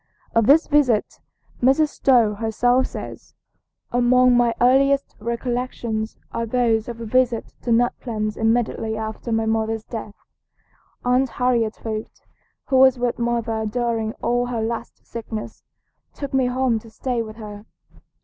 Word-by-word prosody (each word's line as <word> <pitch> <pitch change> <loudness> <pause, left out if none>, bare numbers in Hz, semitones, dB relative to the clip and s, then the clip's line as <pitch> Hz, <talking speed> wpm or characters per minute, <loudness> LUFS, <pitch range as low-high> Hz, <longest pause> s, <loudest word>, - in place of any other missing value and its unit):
Of 230 -1 +3
this 310 +4 +6
visit 275 -8 +2 0.4
Mrs. 270 +5 +4
Stowe 240 -8 +3
herself 245 +4 +1
says: - - -9 0.6
"Among 245 +1 +4
my 240 -1 +4
earliest 275 +3 +3
recollections 235 -1 -3
are 230 0 -3
those 225 -2 +1
of 235 -1 -7
a 230 - -5
visit 245 0 +1
to 240 - -2
Nut 240 +1 +3
Plains 215 -3 -3
immediately 225 -1 0
after 220 +2 -5
my 225 0 +1
mother's 220 0 -1
death. 220 -3 -7 0.9
Aunt 250 +1 +2
Harriet 235 -3 0
Foote, 220 -1 -6 0.4
who 265 - +1
was 260 -1 +6
with 245 -1 -1
mother 235 -2 -1
during 225 -1 -1
all 245 +1 +1
her 235 -2 -2
last 230 +1 -5
sickness, 225 -2 -7 0.5
took 280 -2 -6
me 265 -1 +3
home 250 -2 +1
to 225 - -15
stay 245 +1 -2
with 215 -1 -7
her. 210 -1 -10
235 Hz, 140 wpm, -22 LUFS, 220-250 Hz, 0.9 s, this